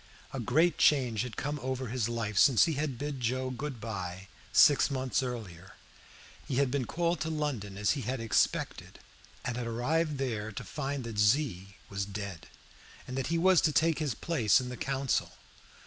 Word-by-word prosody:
A 135 - -3
great 155 +8 +2
change 125 -7 +3
had 125 -2 -5
come 145 +1 -2
over 130 -1 -3
his 120 -1 -1
life 115 -3 -3
since 120 +3 +6
he 165 - +1
had 145 -3 -2
bid 145 +1 -4
Joe 130 +2 -1
good 130 0 -5
by 95 -3 -6 0.2
six 145 0 +6
months 130 0 0
earlier. 105 -8 -6 0.7
He 130 - -2
had 135 -1 +2
been 135 -2 0
called 170 +5 0
to 160 - -2
London 135 -11 -3
as 105 0 +2
he 145 - -1
had 130 +3 -3
expected, 115 -1 0 0.5
and 120 0 -2
had 120 -1 -3
arrived 150 +6 0
there 110 -5 -2
to - - -6
find 140 -2 -4
that 115 -3 -5
Z 105 -4 +1
was 100 -1 -3
dead, 100 -4 -6 0.6
and 130 - -5
that 135 -1 -1
he 170 - 0
was 185 +1 +5
to 160 - +3
take 160 +1 +2
his 145 -8 -1
place 130 -9 +2
in 125 -1 -5
the 125 - -5
council. 135 0 -1
130 Hz, 185 wpm, -30 LUFS, 110-145 Hz, 0.7 s, since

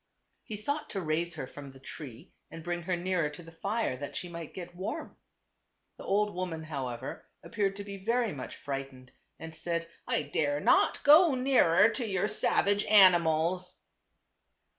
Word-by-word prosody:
He 215 - -6
sought 285 +8 -2
to 195 - -3
raise 170 +1 -1
her 145 - -4
from 140 +1 -10
the 135 0 -14
tree 135 -3 -10 0.2
and 165 0 -9
bring 175 0 -3
her 180 +1 -1
nearer 175 -3 0
to 150 +4 -11
the 165 - -13
fire, 200 - -2
that 140 +1 -7
she 180 - -4
might 170 -2 -7
get 180 -1 -7
warm. 185 +2 -5 0.8
The - - -10
old 210 +1 +1
woman, 175 -3 -4
however, 130 -6 -5 0.2
appeared 200 -3 -1
to 200 - -6
be 200 0 -7
very 230 0 +1
much 130 -3 -7
frightened, 135 -2 -6 0.3
and 160 0 -9
said, 170 +1 -2 0.2
"I - - 0
dare 145 0 0
not - - +3
go 305 0 +7
nearer 250 -8 +5
to 230 +2 -3
your 195 0 0
savage 205 -1 +2
animals." 180 -3 +4
175 Hz, 165 wpm, -30 LUFS, 155-205 Hz, 0.8 s, go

